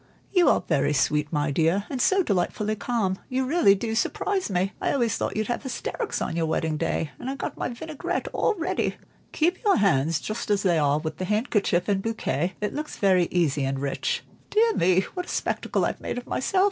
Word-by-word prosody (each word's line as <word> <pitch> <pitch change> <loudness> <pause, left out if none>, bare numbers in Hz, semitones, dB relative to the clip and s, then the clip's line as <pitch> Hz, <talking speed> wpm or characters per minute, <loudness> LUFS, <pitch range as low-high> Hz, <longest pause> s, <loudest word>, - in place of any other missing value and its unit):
"You 360 -3 +5
are - - +3
very 145 +1 +2
sweet, 150 +2 +1
my 145 -2 0
dear, 165 +7 +2
and 265 -3 -3
so 385 +6 +4
delightfully 210 - 0
calm, 205 -4 -1
you 260 +1 0
really 260 - +5
do 220 +3 -3
surprise 380 - 0
me. 190 +1 0
I - - +1
always 240 -5 +1
thought - - -2
you'd 215 - 0
have 240 - -2
hysterics 285 - -3
on - - -3
your 165 -1 0
wedding 160 0 0
day, 150 0 -1
and 265 +2 -4
got - - -4
my - - -3
vinaigrette 300 +5 -4
all - - +1
ready. 360 0 -1 0.4
Keep 345 +7 0
your 410 -3 +4
hands 165 -6 +2
just 215 +1 -5
as 205 -1 +2
they 175 -4 +3
are, 145 -1 +3
with 155 0 -4
the 185 - -3
handkerchief 210 -4 +1
and 200 -2 +1
bouquet, 185 -6 -1
it 210 - -1
looks 300 +1 -5
very 185 -3 +3
easy 155 -6 +1
and 135 0 -1
rich. 140 - -2 0.3
Dear 450 +1 +3
me, 185 - +3
what 360 -1 -4
a - - -9
spectacle - - -1
I've - - -3
made - - -4
of 245 - -5
myself! 375 +8 0
205 Hz, 210 wpm, -25 LUFS, 165-265 Hz, 0.4 s, You